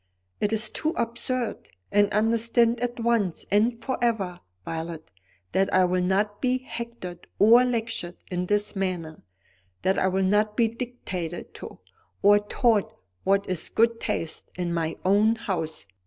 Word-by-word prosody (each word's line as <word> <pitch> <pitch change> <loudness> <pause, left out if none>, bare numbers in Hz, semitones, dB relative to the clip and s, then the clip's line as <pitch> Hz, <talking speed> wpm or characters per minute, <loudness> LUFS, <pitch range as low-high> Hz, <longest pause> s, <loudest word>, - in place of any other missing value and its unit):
It 205 - 0
is 215 -1 +1
too 315 +1 -1
absurd. 235 +1 -2 0.2
And 205 0 +4
understand 230 +2 +2
at 245 0 -3
once 230 -7 0
and 225 +3 +3
for 250 +1 -3
ever, 195 -7 0 0.3
Violet, 165 -3 -5 0.4
that 195 0 +1
I 185 0 +5
will 180 0 +1
not 205 +3 0
be 255 -1 +2
hectored 235 -8 -7
or 230 +4 +7
lectured 230 -7 -2 0.2
in 180 0 -2
this 205 +1 +2
manner, 180 -5 -3 0.6
that 190 - +2
I - - +2
will 190 +1 +1
not 210 +2 +2
be 235 -2 +4
dictated 205 -8 -5
to, - - -9 0.5
or 205 +1 +7
taught 210 0 +1 0.3
what 195 +1 +2
is 185 -3 -1
good 230 0 +2
taste, 165 - -3
in 175 -1 -2
my 165 -1 -1
own 210 +4 +4
house. 165 - -3
205 Hz, 150 wpm, -26 LUFS, 185-230 Hz, 0.6 s, or